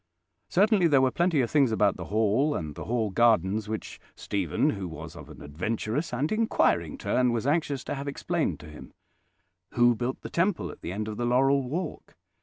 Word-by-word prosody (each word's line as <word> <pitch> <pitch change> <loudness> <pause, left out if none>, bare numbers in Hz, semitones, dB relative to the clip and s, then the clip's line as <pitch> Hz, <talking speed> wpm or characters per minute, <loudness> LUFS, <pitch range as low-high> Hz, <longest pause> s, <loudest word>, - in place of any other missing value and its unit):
Certainly 200 -1 +4
there 145 -4 +4
were 130 -1 +3
plenty 170 -3 +2
of 120 - -2
things 140 -6 +3
about 105 -2 +2
the - - -7
Hall 110 +8 +1
and 75 -3 -4
the - - -8
Hall 115 -3 -1
gardens 105 -1 +2
which 110 -1 -5 0.2
Stephen, 95 -6 0
who 95 -2 -5
was 80 -3 -9
of - - -11
an - - -11
adventurous 110 - -3
and 130 +5 -1
inquiring 85 - +1
turn, 125 -1 +1
was 120 0 -2
anxious 145 -2 0
to - - -4
have 140 0 -5
explained 140 - -2
to - - -11
him. 75 - -12 0.8
"Who 120 0 +5
built 120 +3 -3
the - - -8
temple 180 +2 0
at - - -14
the - - -5
end 105 +3 -3
of 105 -1 -5
the 120 - -1
laurel 135 +3 +3
walk? 165 +3 -5
120 Hz, 200 wpm, -27 LUFS, 105-145 Hz, 0.8 s, Who